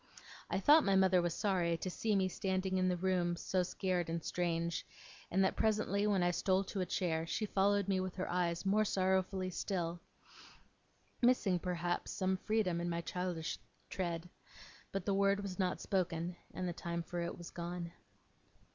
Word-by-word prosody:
I - - 0
thought 300 +9 +7
my 195 -1 +3
mother 190 -1 +5
was 175 -1 -1
sorry 175 -5 +1
to 185 - -3
see 215 +3 0
me 190 -1 +3
standing 190 0 -1
in 185 - +2
the 180 -1 +1
room 175 -1 +1
so 185 +2 0
scared 180 -1 -1
and 165 -1 -2
strange, 170 -1 -1 0.5
and 190 +2 +3
that, 190 - +2
presently, 210 -2 +1
when 195 -3 +2
I 175 - +3
stole 185 +2 +2
to 195 0 -3
a 180 - -1
chair, 165 -2 -1
she 215 - -1
followed 200 0 +2
me 195 -1 +2
with 185 -1 -3
her 185 - -3
eyes 175 0 0
more 210 +3 +4
sorrowfully 190 -1 +1
still 175 -2 -2 1.2
missing, 240 -7 +3
perhaps, 175 0 -2
some 190 0 0
freedom 185 -4 0
in 175 - -1
my 170 0 -1
childish 180 -2 -3 0.3
tread 175 -2 -2 0.6
but 195 -2 -3
the 200 - +1
word 200 +1 +3
was 200 -1 -6
not 185 -1 0
spoken, 175 -2 -1 0.2
and 185 -1 -3
the 175 - -2
time 170 0 -3
for 175 +1 -4
it 170 - -3
was 175 - -9
gone. 170 0 -5
185 Hz, 180 wpm, -35 LUFS, 175-195 Hz, 1.2 s, thought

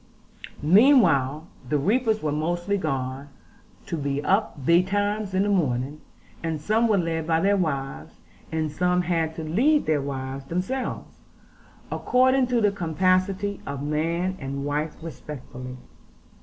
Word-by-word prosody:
Meanwhile 160 - +5 0.2
the 150 - +2
reapers 220 - +1
were 150 - 0
mostly 175 +6 -1
gone, 135 -5 -3 0.6
to - - -3
be 140 -1 -1
up 190 -8 0
betimes 200 +4 +2
in 190 - +3
the 205 - 0
morning; 145 -6 0 0.4
and 160 -2 -2
some 215 +9 +2
were 215 -3 +3
led 165 -3 -1
by 165 -1 +2
their 200 +4 +3
wives; 140 -7 -3 0.4
and 160 -1 -1
some 180 +3 +1
had 165 -2 -1
to 160 - -5
lead 255 - +2
their 150 -2 +1
wives 135 -1 -5
themselves, 185 - -4 0.7
according 260 +1 +3
to 245 -2 +1
the 205 -1 +3
capacity 185 +3 0
of 140 0 -4
man 165 +5 -1
and 140 +1 -4
wife 150 +2 -2
respectively. 130 -5 -8
165 Hz, 135 wpm, -25 LUFS, 145-200 Hz, 0.7 s, Meanwhile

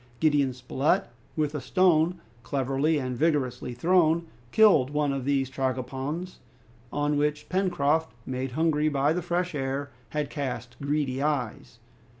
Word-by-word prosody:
Gideon 145 -4 +3
Spilett, 130 +3 0 0.3
with 150 -2 0
a 150 - -3
stone 175 +3 +3 0.2
cleverly 135 +4 0
and 130 -3 -2
vigorously 135 -4 0
thrown, 170 +3 +3 0.3
killed 205 -12 +5
one 145 -1 0
of 135 -2 -3
these 135 -1 +1
tragopans, 135 +6 -3 0.5
on 145 0 0
which 150 0 -1
Pencroft, 160 -4 +1
made 130 0 -3
hungry 155 0 +2
by 145 +1 +2
the 180 - -1
fresh 175 +1 -1
air, 140 0 -3 0.2
had 150 -2 -2
cast 125 -5 -4
greedy 140 -2 -1
eyes. 135 -7 -2
145 Hz, 135 wpm, -27 LUFS, 135-160 Hz, 0.5 s, killed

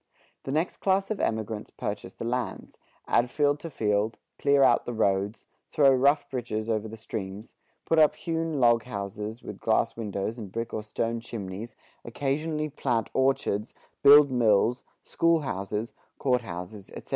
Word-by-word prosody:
The 135 - -3
next 160 +5 -1
class 195 +1 +1
of 215 - -2
emigrants 110 -1 -2
purchase 100 -2 -5
the - - -7
lands, 125 +1 -4 0.3
add 120 +1 +3
field 145 +1 +1
to 165 - -7
field, 105 -4 0 0.2
clear 140 -1 +4
out - - +4
the 120 - -3
roads, 100 0 0 0.2
throw 140 -2 +5
rough 140 +3 +3
bridges 115 -4 -3
over 110 0 -1
the 110 +1 -9
streams, 105 -1 -6 0.3
put 165 - +3
up 155 -1 +5
hewn 165 -3 -2
log 120 -2 +5
houses 105 0 -6
with 105 - -8
glass 115 0 +1
windows 110 +1 -3
and 100 -4 -7
brick 115 +2 -4
or 110 - -2
stone 115 +2 -2
chimneys, 110 -1 -7 0.3
occasionally 150 +5 -2
plant 125 -6 -1
orchards, 130 -5 0 0.3
build 145 0 +8
mills, 120 0 +3 0.2
school 165 -1 +2
houses, 105 -1 -3 0.2
court 125 -2 +1
houses, 95 0 -8
etc. - - -10
115 Hz, 155 wpm, -27 LUFS, 105-140 Hz, 0.3 s, build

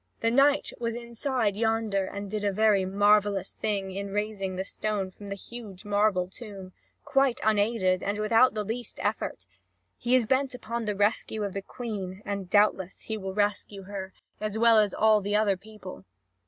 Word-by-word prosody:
The 230 - +2
knight 280 +3 +3
was 230 -1 -2
inside 235 -2 -1
yonder, 220 -3 +1
and 200 +1 -6
did 215 -1 -2
a 205 - +2
very 205 -1 +3
marvellous 205 0 +3
thing 200 -3 -2
in 200 +1 -4
raising 205 -2 -2
the 190 - -2
stone 200 -1 -3
from 200 +2 -11
the 200 - -3
huge 210 -2 -10
marble 205 -3 +2
tomb, 195 -3 -10 0.3
quite 270 -2 +2
unaided 205 -3 +2
and 205 +1 -2
without 225 +3 +4
the 210 - -1
least 225 +2 -5
effort. - - -2 0.5
He 245 +2 +2
is 250 -3 +4
bent 260 +2 +1
upon 235 -1 -4
the 210 -1 -1
rescue 210 +1 0
of 200 -2 -3
the 195 - -3
Queen, 200 -4 -6
and 200 -3 -4
doubtless 200 -2 +2
he 220 - -4
will 190 -2 -5
rescue 205 -1 -1
her, 190 -1 -6 0.3
as 215 0 -3
well 230 -1 +6
as 210 -3 +2
all 215 -1 +4
the 205 +1 -1
other 210 -2 +3
people. 195 - -11
210 Hz, 180 wpm, -28 LUFS, 195-225 Hz, 0.5 s, well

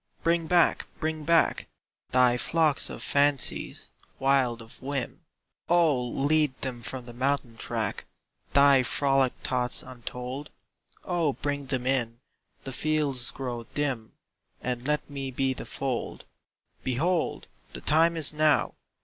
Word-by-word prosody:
Bring 165 0 +2
back, 175 0 +3
bring 155 -1 -2
back 165 +1 +3 0.4
Thy 125 -1 +4
flocks 155 +3 +1
of - - -7
fancies, 140 -1 +2 0.3
wild 135 -3 +2
of 115 0 -13
whim. 135 -1 -4 0.5
Oh 165 -7 +4
lead 140 +2 +1
them 125 -3 -4
from 125 +1 -6
the 120 - -9
mountain 130 -1 -1
track 115 -3 -3 0.5
Thy 140 -1 +6
frolic 135 0 +2
thoughts 125 -1 +2
untold. 125 +3 -7 0.6
Oh 170 -5 +1
bring 145 -1 -3
them 130 -2 -2
in 120 -3 0 0.4
the 135 - -6
fields 145 -4 0
grow 120 -3 -5
dim 135 -7 -2 0.5
And 125 +1 -3
let 150 0 0
me 140 -2 -5
be 130 +1 0
the - - -8
fold. 130 -3 -4 0.6
Behold, 160 +7 0 0.3
The - - -7
time 165 +2 +3
is 155 -1 +3
now! 155 -1 +3
135 Hz, 130 wpm, -27 LUFS, 125-150 Hz, 0.6 s, Thy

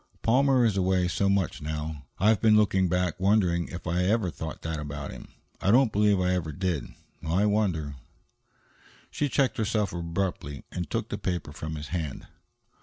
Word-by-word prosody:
"Palmer 130 +1 +4
is 105 -4 +1
away 95 -1 +2
so 95 +3 +1
much 100 -4 0
now. 75 -2 -5
I've 105 +1 +3
been 110 -1 +6
looking 95 -3 +3
back, 90 +1 0
wondering 95 -3 +2
if 90 - -8
I 90 +2 0
ever 105 -2 +1
thought 80 0 -7
that 80 -1 -3
about 75 -1 -5
him. - - -10 0.3
I - - +1
don't 120 +1 +5
believe 105 -1 +3
I 90 0 +2
ever 85 -4 -2
did. 85 -4 -2 0.4
I 85 +6 +1
wonder 90 -10 0 0.6
" - - -29
She 145 - -1
checked 135 -1 +1
herself 105 -2 0
abruptly 85 -5 -3
and 90 -4 -4
took - - -2
the - - -4
paper 90 -5 -3
from 80 +1 -5
his 75 -1 -7
hand. 80 -5 -4
90 Hz, 180 wpm, -27 LUFS, 80-105 Hz, 0.6 s, been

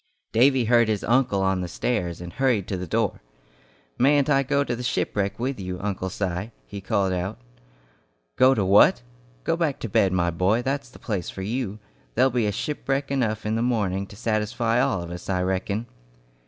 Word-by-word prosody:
Davy 130 +2 +4
heard 120 0 +4
his 105 -2 -1
uncle 115 -5 +2
on 95 -1 +1
the 90 - -3
stairs, 85 -2 -2
and 85 -1 -8
hurried 125 -8 +1
to 100 - -2
the 90 0 -5
door. 110 +2 -1 0.8
"Mayn't 140 +2 +4
I 135 -1 +4
go 140 +1 +1
to 120 - -2
the 120 - -6
shipwreck 100 -4 -1
with 130 0 -2
you, 90 -1 -5
Uncle 95 -2 -3
Si?" 95 +2 -3 0.2
he 100 -1 -8
called 95 -1 0
out. 90 +1 -3 1.0
"Go 130 +1 +5
to 100 - +1
what? 105 - +5 0.4
Go 165 - +1
back 165 -5 0
to - - -3
bed, 95 -2 +3
my 85 -1 +1
boy, 95 +8 +1
that's 135 0 -2
the - - -15
place 100 -6 -3
for 95 - -6
you. 110 -1 -3 0.4
There'll 130 +2 +4
be 115 -3 +1
shipwreck 135 +4 -2
enough 110 -6 -1
in 105 - 0
the 115 - 0
morning 100 -6 0
to 100 - -13
satisfy 115 +2 0
all 130 -10 0
of 85 - -8
us, 90 +1 -8
I 90 -1 +1
reckon." 95 +4 -1
110 Hz, 195 wpm, -24 LUFS, 95-125 Hz, 1.0 s, Go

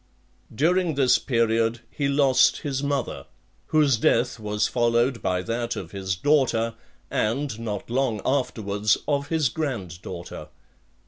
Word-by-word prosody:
XXVI. - - -16
During 175 +1 +2
this 130 -3 +4
period 115 -2 +1
he 140 - -1
lost 140 -2 +3
his 140 -2 -2
mother, 140 -3 -2 0.4
whose 150 -6 +3
death 115 - +1
was 105 -1 0
followed 120 +1 +1
by 90 0 -1
that 120 +2 -2
of 85 -4 -7
his 95 -1 -3
daughter, 115 -1 +2 0.4
and, 115 +1 -1
not 105 -3 -4
long 120 -3 0
afterwards, 110 -6 +1
of 140 -1 0
his 160 -2 +1
granddaughter. 95 - -5
120 Hz, 130 wpm, -24 LUFS, 110-140 Hz, 0.4 s, this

